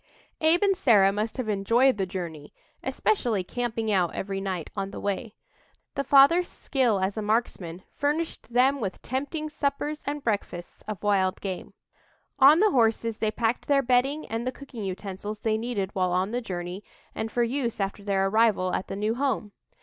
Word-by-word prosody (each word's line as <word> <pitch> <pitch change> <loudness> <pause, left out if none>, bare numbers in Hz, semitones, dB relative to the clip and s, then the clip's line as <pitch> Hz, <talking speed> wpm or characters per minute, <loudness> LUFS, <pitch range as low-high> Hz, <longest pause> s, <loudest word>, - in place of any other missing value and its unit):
Abe 325 +4 +4
and 395 -1 +4
Sarah 205 - +5
must 215 +4 -2
have 255 -4 -2
enjoyed 230 +5 +3
the 190 - 0
journey, 170 -6 -6 0.3
especially 240 - 0
camping 225 +1 -2
out 180 -4 +1
every 195 0 -3
night 185 -5 -4
on 195 -1 -2
the - - -7
way. 205 +2 -3 0.6
The 275 - -1
father's 285 +6 +6
skill 245 -7 0
as 190 +3 -1
a - - -1
marksman 205 -5 -1
furnished 295 -2 -2
them 260 +3 +3
with 195 -4 -4
tempting 285 +4 -3
suppers 295 0 -2
and 290 0 -3
breakfasts 200 -5 -3
of 210 -3 -5
wild 195 -2 +2
game. 190 -2 -6 0.6
On 285 +4 +8
the 425 -1 +5
horses 230 -3 +2
they 215 - 0
packed 225 +2 -1
their 280 -1 +3
bedding 265 +5 +2
and 230 +2 -3
the - - 0
cooking 255 -4 -9
utensils 200 +2 -5
they 220 -1 +1
needed 215 -5 -3
while 185 -2 0
on 185 +3 0
the 245 +1 -1
journey, 180 -2 -5 0.3
and 220 0 -4
for 240 - +1
use 235 -2 -2
after 195 +1 -3
their 195 -1 +1
arrival 200 -3 +2
at - - -2
the - - -5
new 210 +2 0
home. 250 -5 -1
220 Hz, 180 wpm, -26 LUFS, 195-265 Hz, 0.6 s, On